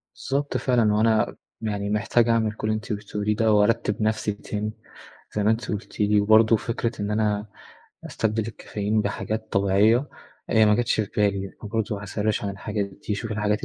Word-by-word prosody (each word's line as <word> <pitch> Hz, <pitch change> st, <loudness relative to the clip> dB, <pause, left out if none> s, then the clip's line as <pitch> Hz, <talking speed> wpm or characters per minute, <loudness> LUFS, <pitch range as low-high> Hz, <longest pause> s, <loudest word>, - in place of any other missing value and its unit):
بالضبط 140 Hz, +1 st, -2 dB
فعلًا، 120 Hz, -5 st, +2 dB
هو 105 Hz, -, +2 dB
أنا 110 Hz, -1 st, +2 dB, 0.3 s
يعني 105 Hz, -2 st, -2 dB
محتاج 105 Hz, +3 st, +2 dB
أعمل 110 Hz, -2 st, +2 dB
كل 110 Hz, -, -4 dB
اللي 110 Hz, -, +1 dB
أنتِ 110 Hz, -, -6 dB
قلتيه 105 Hz, 0 st, -5 dB
لي 105 Hz, +1 st, +1 dB
ده 110 Hz, +1 st, +2 dB
وأرتِب 105 Hz, +1 st, +2 dB
نفسي 110 Hz, 0 st, 0 dB
تاني 105 Hz, +1 st, -4 dB, 0.6 s
زي 105 Hz, -, +1 dB
ما 105 Hz, -, +4 dB
أنت 115 Hz, +1 st, -2 dB
قُلتِ 105 Hz, +2 st, -6 dB
لي، 105 Hz, 0 st, +3 dB
وبرضه 110 Hz, +2 st, +5 dB
فكرة 115 Hz, 0 st, -3 dB
إن 105 Hz, +1 st, -2 dB
أنا 105 Hz, -1 st, 0 dB, 0.6 s
أستبدل 110 Hz, 0 st, -1 dB
الكافيين 105 Hz, -1 st, -2 dB
بحاجات 110 Hz, +2 st, -3 dB
طبيعية، 105 Hz, +7 st, +3 dB, 0.4 s
هي 110 Hz, -1 st, +5 dB
ما 105 Hz, -, +5 dB
جاتش 120 Hz, -1 st, +1 dB
في 105 Hz, -, -3 dB
بالي، 100 Hz, -2 st, +1 dB
فبرضه 105 Hz, -1 st, -2 dB
هأسرِّش 105 Hz, +1 st, -1 dB
عن 100 Hz, -, -1 dB
الحاجات 100 Hz, +1 st, -3 dB, 0.2 s
دي، 105 Hz, -, +1 dB
شوف 110 Hz, +2 st, -4 dB
الحاجات 105 Hz, 0 st, 0 dB
105 Hz, 180 wpm, -24 LUFS, 105-110 Hz, 0.6 s, وبرضه